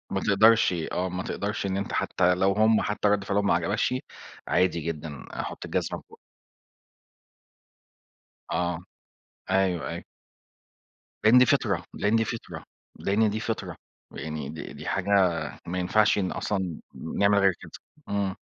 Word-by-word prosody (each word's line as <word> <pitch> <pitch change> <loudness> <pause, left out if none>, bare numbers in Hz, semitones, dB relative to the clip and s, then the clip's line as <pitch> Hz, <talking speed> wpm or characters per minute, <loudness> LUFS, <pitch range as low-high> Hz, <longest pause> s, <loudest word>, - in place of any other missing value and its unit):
ما 95 - -1
تقدرش 110 +1 +5
آه 90 +2 -2
ما 90 0 -4
تقدرش 105 +1 -3
إن 95 0 -1
أنت 100 - -3
حتى 90 +1 +2
لو 95 +2 +3
هُم 110 +2 +4
حتى 105 0 0
رد 100 -1 +2
فعلهم 100 +1 0
ما - - +4
عجبكش، 105 +5 +1 0.5
عادي 90 -2 +2
جدًا 80 -2 -5
حط - - -5
الجزمة - - -2
في - - -22
بوق - - -16 2.3
آه 85 -1 0 0.7
أيوه 95 -6 +1
أيوه. - - -6 1.2
لإن 110 +4 +7
دي 125 - +8
فطرة - - +1
لإن 105 +2 +1
دي 115 0 +3
فطرة 115 - -6 0.4
لإن 105 +2 +2
دي 105 +1 -2
فطرة. 115 0 -4 0.4
ويعني 75 -3 -5
دي 80 +2 -7
دي - - -10
حاجة 100 0 -2 0.6
ما 90 +2 -3
ينفعش 105 +4 +3
إن 95 -3 0
أصلًا 95 -5 -2 0.2
نعمل 100 0 +1
غير 95 -1 +4
كده. - - -11 0.4
إمم. 100 -2 -1
100 Hz, 145 wpm, -27 LUFS, 90-105 Hz, 2.3 s, دي